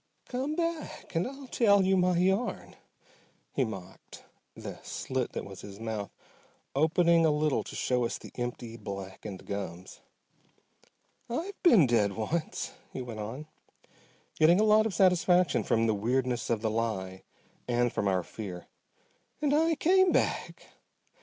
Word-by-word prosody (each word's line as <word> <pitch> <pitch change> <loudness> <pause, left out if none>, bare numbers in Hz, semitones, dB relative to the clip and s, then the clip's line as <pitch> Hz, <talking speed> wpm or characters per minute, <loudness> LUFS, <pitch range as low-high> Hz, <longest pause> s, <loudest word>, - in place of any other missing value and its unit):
"Come 265 +5 -2
back 335 -1 -3
and 165 +4 +1
I'll 275 +1 -9
tell 205 -6 +4
you 190 +1 +3
my 180 -1 +3
yarn," 190 +6 0 0.8
he 135 - +2
mocked, 95 -5 -8 0.3
the - - -8
slit 130 -2 -3
that - - -4
was 100 -1 -10
his 100 0 -10
mouth 110 -3 -4 0.6
opening 165 +3 +4
a 160 - +5
little 150 -1 +1
to - - -9
show 125 -1 +1
us 115 - -2
the - - -12
empty, 120 -2 -5
blackened 100 -1 -7
gums. 95 -3 -6 1.3
"I've 340 +12 -4
been 230 - +7
dead 110 -5 +2
once," 155 - -2 0.2
he 130 - -5
went 115 -3 -7
on, 115 +8 -5 0.9
getting 170 +4 +6
a - - +4
lot 215 0 +5
of 210 - -5
satisfaction 180 -3 +4
from 115 0 +2
the 110 - +2
weirdness 120 +3 0
of 115 -3 0
the 110 - +1
lie 95 -5 -2 0.5
and 120 0 +1
from 100 - 0
our 95 -2 +1
fear, 95 -5 -7 0.7
"and 295 -2 +1
I 325 +2 +3
came 375 +4 +4
back. - - -1
130 Hz, 145 wpm, -29 LUFS, -, 1.3 s, been